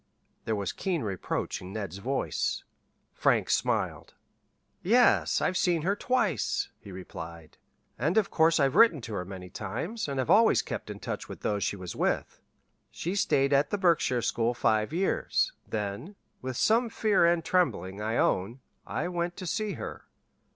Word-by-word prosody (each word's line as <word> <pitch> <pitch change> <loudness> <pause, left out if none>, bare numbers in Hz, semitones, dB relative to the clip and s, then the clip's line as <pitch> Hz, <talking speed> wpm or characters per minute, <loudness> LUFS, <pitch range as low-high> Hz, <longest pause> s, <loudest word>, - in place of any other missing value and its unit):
There 110 - 0
was 100 -2 -2
keen 175 -8 -2
reproach 95 -4 -3
in 90 +1 -8
Ned's 100 -4 -5
voice. 135 +6 -1 0.5
Frank - - +2
smiled. - - -1 0.7
"Yes, 235 +7 +4
I've 185 - +1
seen 175 -3 +2
her 195 +4 +1
twice," 215 - 0
he 100 - -11
replied. 85 -3 -9 0.4
"And 155 - +1
of 210 -3 +2
course 160 0 +4
I've 135 -2 +3
written 225 -10 +6
to 115 - -7
her 90 -3 -3
many 90 -1 -9
times, 160 - -4
and 140 -1 -3
have 130 - 0
always 225 +2 +5
kept - - -5
in - - -6
touch - - -5
with - - -8
those 105 -1 -1
she - - -1
was 90 -3 -7
with. - - -1 0.5
She 175 - -4
stayed 140 -8 +2
at 140 +1 +3
the 205 - -1
Berkshire 165 - +2
school 120 +1 0
five 110 +1 +1
years; 195 - 0
then 105 - -4 0.3
with 130 -1 -4
some 230 +2 +3
fear 215 -5 +2
and 170 -1 +2
trembling, 100 - 0
I 110 +2 -1
own 100 +8 +1 0.3
I - - -2
went 175 0 -2
to 185 - -6
see 215 +4 -1
her. - - -7
140 Hz, 165 wpm, -28 LUFS, -, 0.7 s, written